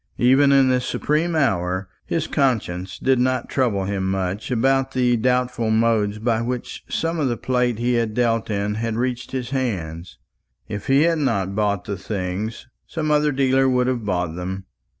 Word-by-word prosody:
Even 135 Hz, +3 st, +5 dB
in 135 Hz, -1 st, +5 dB
this 125 Hz, -1 st, +2 dB
supreme 160 Hz, +3 st, 0 dB
hour 95 Hz, -, 0 dB, 0.2 s
his -, -, -1 dB
conscience 95 Hz, -9 st, -1 dB
did 130 Hz, -1 st, +2 dB
not 130 Hz, 0 st, 0 dB
trouble 115 Hz, -8 st, +1 dB
him 95 Hz, -1 st, -1 dB
much 95 Hz, +1 st, -2 dB
about 135 Hz, +2 st, +1 dB
the 125 Hz, -1 st, +2 dB
doubtful 125 Hz, -1 st, 0 dB
modes 110 Hz, -2 st, +2 dB
by 110 Hz, +1 st, 0 dB
which 125 Hz, +1 st, -4 dB
some 165 Hz, 0 st, -1 dB
of 145 Hz, -, +1 dB
the 120 Hz, -2 st, -1 dB
plate 125 Hz, -3 st, 0 dB
he 120 Hz, +2 st, 0 dB
had 115 Hz, -2 st, 0 dB
dealt 115 Hz, -2 st, +1 dB
in 100 Hz, 0 st, -1 dB
had 115 Hz, +1 st, -2 dB
reached 125 Hz, +1 st, -2 dB
his 125 Hz, -1 st, -4 dB
hands. 90 Hz, -11 st, -3 dB, 0.5 s
If 105 Hz, -1 st, -6 dB
he 135 Hz, +2 st, +4 dB
had 165 Hz, -1 st, +2 dB
not 100 Hz, -9 st, 0 dB
bought 100 Hz, -2 st, 0 dB
the 100 Hz, -2 st, -4 dB
things, 100 Hz, +4 st, -4 dB, 0.2 s
some 155 Hz, -2 st, -2 dB
other 150 Hz, 0 st, +3 dB
dealer 135 Hz, -1 st, +3 dB
would 125 Hz, -1 st, +2 dB
have 125 Hz, -2 st, -1 dB
bought 90 Hz, -5 st, -1 dB
them. 95 Hz, +2 st, -5 dB
120 Hz, 175 wpm, -22 LUFS, 100-130 Hz, 0.5 s, Even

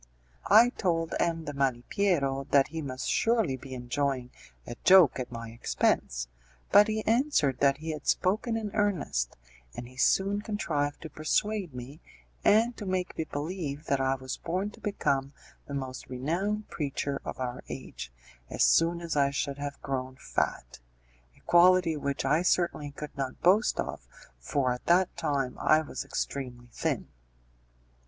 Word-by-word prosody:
I 225 Hz, +4 st, +8 dB
told 165 Hz, -8 st, -1 dB
M. 165 Hz, -1 st, 0 dB
de 145 Hz, -, -4 dB
Malipiero 135 Hz, +2 st, 0 dB
that 140 Hz, 0 st, +4 dB
he 160 Hz, +1 st, -4 dB
must 130 Hz, -2 st, -5 dB
surely 225 Hz, -, +2 dB
be 130 Hz, 0 st, -9 dB
enjoying 125 Hz, 0 st, -2 dB, 0.3 s
a -, -, -6 dB
joke 185 Hz, -8 st, +7 dB
at 125 Hz, 0 st, -4 dB
my 115 Hz, -1 st, -6 dB
expense, -, -, 0 dB, 0.4 s
but 205 Hz, 0 st, +7 dB
he 215 Hz, 0 st, -2 dB
answered 225 Hz, -, +2 dB
that 140 Hz, -1 st, +4 dB
he 160 Hz, +2 st, -4 dB
had 150 Hz, -2 st, -7 dB
spoken 215 Hz, +5 st, +1 dB
in 215 Hz, -2 st, -4 dB
earnest, 175 Hz, -, 0 dB, 0.4 s
and 120 Hz, -, -6 dB
he 125 Hz, +1 st, -16 dB
soon 200 Hz, +8 st, +2 dB
contrived 160 Hz, -10 st, -2 dB
to 160 Hz, -, -6 dB
persuade 180 Hz, +2 st, -1 dB
me 130 Hz, +5 st, -8 dB, 0.4 s
and 230 Hz, +3 st, +4 dB
to 210 Hz, -, -6 dB
make 185 Hz, -1 st, -2 dB
me 160 Hz, -, -2 dB
believe 150 Hz, -1 st, -4 dB
that 140 Hz, -1 st, +1 dB
I 135 Hz, 0 st, +2 dB
was 130 Hz, 0 st, -6 dB
born 185 Hz, +5 st, -2 dB
to 225 Hz, -, -16 dB
become 140 Hz, -10 st, -1 dB, 0.3 s
the 140 Hz, -, -5 dB
most 130 Hz, -2 st, -5 dB
renowned 175 Hz, +12 st, -2 dB
preacher 140 Hz, -1 st, -3 dB
of -, -, -6 dB
our 125 Hz, -1 st, -3 dB
age -, -, -7 dB, 0.4 s
as -, -, +1 dB
soon 170 Hz, +1 st, +4 dB
as 170 Hz, -2 st, -3 dB
I 140 Hz, -1 st, +3 dB
should 140 Hz, 0 st, -3 dB
have 145 Hz, -1 st, -5 dB
grown 130 Hz, -1 st, -3 dB
fat -, -, -3 dB, 0.6 s
a -, -, -23 dB
quality 175 Hz, -1 st, +5 dB
which 140 Hz, -2 st, -2 dB
I 150 Hz, +5 st, +3 dB
certainly 170 Hz, -4 st, +1 dB
could 145 Hz, +1 st, -8 dB
not 135 Hz, -2 st, -4 dB
boast 200 Hz, +6 st, +3 dB
of, -, -, -4 dB, 0.3 s
for 135 Hz, -4 st, 0 dB
at 125 Hz, -, -9 dB
that 180 Hz, +1 st, +3 dB
time 140 Hz, -6 st, -1 dB
I 155 Hz, 0 st, +4 dB
was 155 Hz, -, -5 dB
extremely 125 Hz, -3 st, -5 dB
thin. -, -, -2 dB
145 Hz, 160 wpm, -29 LUFS, 135-185 Hz, 0.6 s, I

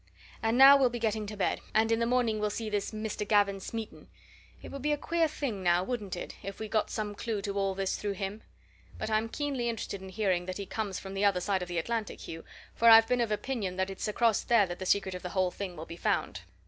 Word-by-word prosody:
And 225 Hz, +2 st, +1 dB
now 275 Hz, +1 st, +10 dB
we'll 265 Hz, -2 st, +4 dB
be 240 Hz, -, -4 dB
getting 215 Hz, -2 st, -1 dB
to 210 Hz, 0 st, -7 dB
bed, 195 Hz, -, 0 dB
and 220 Hz, +1 st, +3 dB
in 225 Hz, -, +2 dB
the 230 Hz, -, +1 dB
morning 240 Hz, -3 st, +1 dB
we'll 210 Hz, 0 st, 0 dB
see 215 Hz, +1 st, -4 dB
this 205 Hz, -1 st, -1 dB
Mr. 215 Hz, -1 st, -4 dB
Gavin 200 Hz, -2 st, +3 dB
Smeaton. 225 Hz, +3 st, -7 dB, 0.5 s
It -, -, -10 dB
would 275 Hz, -, -6 dB
be 300 Hz, +2 st, 0 dB
a -, -, 0 dB
queer 335 Hz, +2 st, +1 dB
thing 270 Hz, -9 st, -4 dB
now, 175 Hz, 0 st, +3 dB
wouldn't 210 Hz, -3 st, -3 dB
it, -, -, -7 dB
if 195 Hz, +1 st, -7 dB
we 220 Hz, -, -4 dB
got 215 Hz, 0 st, 0 dB
some 210 Hz, -1 st, -3 dB
clue 215 Hz, 0 st, -3 dB
to 200 Hz, -, -2 dB
all 195 Hz, -1 st, 0 dB
this 195 Hz, 0 st, -1 dB
through 205 Hz, -1 st, -2 dB
him? 195 Hz, +2 st, -5 dB, 0.6 s
But 220 Hz, -, -4 dB
I'm 220 Hz, +1 st, +1 dB
keenly 270 Hz, -3 st, -2 dB
interested 205 Hz, -3 st, -4 dB
in 190 Hz, -, -9 dB
hearing 185 Hz, -3 st, 0 dB
that 185 Hz, -, -4 dB
he 200 Hz, -, -5 dB
comes 200 Hz, -1 st, -3 dB
from 195 Hz, 0 st, -7 dB
the 195 Hz, +1 st, -1 dB
other 195 Hz, -3 st, +3 dB
side 190 Hz, +1 st, 0 dB
of 180 Hz, -, -4 dB
the 175 Hz, -1 st, -4 dB
Atlantic, 225 Hz, +5 st, -2 dB
Hugh, 165 Hz, 0 st, -7 dB, 0.3 s
for 230 Hz, -, +5 dB
I've 225 Hz, 0 st, +9 dB
been 250 Hz, 0 st, +1 dB
of 230 Hz, -2 st, 0 dB
opinion 210 Hz, -4 st, -2 dB
that 190 Hz, +1 st, -1 dB
it's 195 Hz, -, -4 dB
across 220 Hz, 0 st, +2 dB
there 230 Hz, -4 st, +4 dB
that 175 Hz, -1 st, -7 dB
the 185 Hz, -, -4 dB
secret 195 Hz, -1 st, +2 dB
of 180 Hz, -, -6 dB
the 180 Hz, -, -5 dB
whole 185 Hz, -1 st, +2 dB
thing 190 Hz, -2 st, -6 dB
will 160 Hz, -, -6 dB
be 170 Hz, -, -9 dB
found." 95 Hz, -, -1 dB
210 Hz, 260 wpm, -30 LUFS, 190-230 Hz, 0.6 s, now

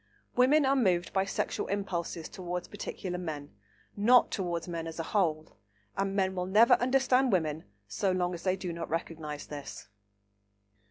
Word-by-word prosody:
Women 275 Hz, +4 st, +5 dB
are 270 Hz, +1 st, +3 dB
moved 185 Hz, -9 st, +1 dB
by 190 Hz, 0 st, +2 dB
sexual 195 Hz, -, -2 dB
impulses 175 Hz, -4 st, -3 dB
towards 180 Hz, -1 st, -5 dB
particular 185 Hz, -3 st, -5 dB
men, 150 Hz, -, -6 dB, 0.4 s
not 240 Hz, +5 st, +5 dB
towards 175 Hz, -4 st, -2 dB
men 165 Hz, -1 st, -4 dB
as 165 Hz, -, -7 dB
a -, -, -1 dB
whole, 160 Hz, -, -1 dB, 0.4 s
and 195 Hz, 0 st, -1 dB
men 190 Hz, -1 st, +1 dB
will 180 Hz, -1 st, -2 dB
never 215 Hz, +5 st, +6 dB
understand 255 Hz, 0 st, +3 dB
women 160 Hz, -4 st, 0 dB, 0.2 s
so 185 Hz, -, 0 dB
long 180 Hz, -1 st, 0 dB
as 170 Hz, -, -6 dB
they 185 Hz, -1 st, +1 dB
do 185 Hz, -2 st, -5 dB
not 165 Hz, 0 st, -5 dB
recognise 160 Hz, -2 st, -4 dB
this. 100 Hz, -10 st, -8 dB
180 Hz, 160 wpm, -30 LUFS, 165-200 Hz, 0.4 s, never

